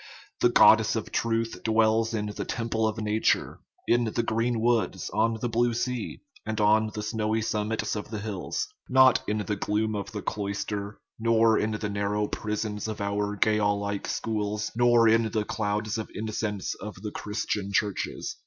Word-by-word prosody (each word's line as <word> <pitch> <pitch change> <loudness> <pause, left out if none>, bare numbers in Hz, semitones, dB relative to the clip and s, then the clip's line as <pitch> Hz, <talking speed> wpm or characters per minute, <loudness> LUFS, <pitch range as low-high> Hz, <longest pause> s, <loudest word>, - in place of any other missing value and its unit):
The - - +4
god - - +7
dess - - -1
of - - -4
truth 115 0 -1
dwells 110 0 +3
in 105 -1 -1
the 105 0 -4
temple 115 -1 -1
of 110 +1 -3
nature, 110 0 0 0.3
in 120 0 +3
the 115 +1 -1
green 115 +1 0
woods, 115 -5 0
on 115 +1 +1
the 120 - -1
blue 120 0 +1
sea, 125 -1 -3 0.2
and 110 0 -3
on 110 +1 +4
the 105 - -3
snowy 110 0 -1
summits 110 0 -1
of 105 - -5
the 110 - -4
hills 105 - -3 0.2
not 130 -1 +6
in 105 - 0
the 105 - -1
gloom 105 +2 -1
of 100 -1 -4
the 105 - -5
cloister, 100 0 -3 0.2
nor 115 0 +4
in 110 - 0
the 105 0 -3
nar 100 0 -1
now 105 0 +1
prisons 105 0 -3
of 110 - -5
our 100 0 -1
jail 105 0 +2
like 100 -1 -3
schools, 105 -1 -2
nor 120 -1 +5
in 115 0 +4
the 105 0 -1
clouds 105 +1 -2
of 110 - -5
incense 105 -2 -3
of 105 +1 -6
the 105 - -4
Christian 105 -1 -3
churches. 100 0 -2
110 Hz, 180 wpm, -27 LUFS, 105-115 Hz, 0.3 s, god